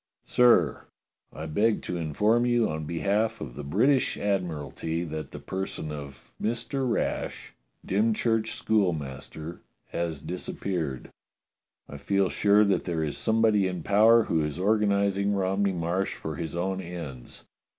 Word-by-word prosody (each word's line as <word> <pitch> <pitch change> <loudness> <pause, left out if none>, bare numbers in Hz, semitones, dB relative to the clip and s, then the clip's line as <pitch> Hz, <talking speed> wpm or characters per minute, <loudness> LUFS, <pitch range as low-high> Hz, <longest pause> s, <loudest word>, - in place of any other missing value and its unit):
"Sir: 115 - +4 0.5
I 80 - -7
beg 105 +8 +1
to - - -3
inform 105 +9 +2
you 120 -2 +3
on 80 0 -4
behalf 105 +7 0
of 70 -11 -6
the 75 - -7
British 125 - +2
Admi 100 -3 0
ralty 80 +4 -4
that 75 -2 -5
the - - -8
person 80 +1 -4
of 70 -3 -9
Mister 120 +4 -1
Rash, 115 - -2 0.3
Dymchurch 110 +2 +1
school 105 -5 +2
master, 75 +3 -7 0.3
has 85 -3 -3
disappeared. 80 -3 -4 0.8
I 70 - -8
feel 95 +6 +1
sure 105 +1 +4
that 100 - +1
there 85 -3 -1
is 75 -2 -2
somebody 110 -3 +3
in 90 -3 -4
power 110 +4 +6
who 80 -5 0
is 75 +1 -3
organizing 100 0 +2
Romney 95 +1 +1
Marsh 90 +2 -1
for 80 -1 -5
his 80 +1 -5
own 95 +2 -1
ends. 85 -9 -8
95 Hz, 140 wpm, -27 LUFS, 80-105 Hz, 0.8 s, power